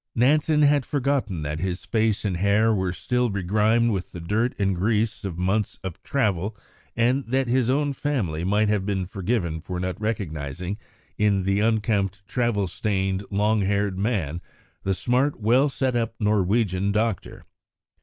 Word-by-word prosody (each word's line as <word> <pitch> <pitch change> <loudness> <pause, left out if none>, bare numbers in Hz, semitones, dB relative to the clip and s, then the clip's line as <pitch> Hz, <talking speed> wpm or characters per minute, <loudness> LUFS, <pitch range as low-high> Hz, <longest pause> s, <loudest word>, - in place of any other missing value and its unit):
] - - -60
Nansen 150 +5 +3
had 145 -1 +4
forgotten 130 - -1
that 75 +1 -3
his 90 +1 -3
face 110 -1 0
and 95 -4 0
hair 105 +4 +3
were 95 -3 0
still 125 +6 0
begrimed 105 +4 +2
with 95 -3 -3
the 90 - -6
dirt 105 +9 0
and 95 -2 +1
grease 110 +4 0
of 95 -4 -4
months 95 +3 0
of 95 -3 -6
travel, 105 -6 -1 0.4
and 125 +4 +2
that 130 +2 +1
his 125 0 +2
own 145 +2 +1
family 115 - -2
might 105 +3 +2
have 105 -2 +1
been 95 -2 -1
forgiven 90 -4 -2
for 90 +1 -5
not 95 +3 -3
recognising 90 -3 -3 0.4
in 100 -2 +2
the 100 +1 +1
unkempt, 105 -3 0
travel 120 -3 0
stained, 95 +1 -1
long 105 +2 +2
haired 100 -1 0
man, 90 -7 -1 0.4
the 95 0 0
smart, 125 +9 +1
well 125 +7 +3
set 130 -2 -1
up 115 -1 -1
Norwegian 100 -2 +1
doctor. 110 -1 -2
105 Hz, 160 wpm, -24 LUFS, 95-115 Hz, 0.4 s, had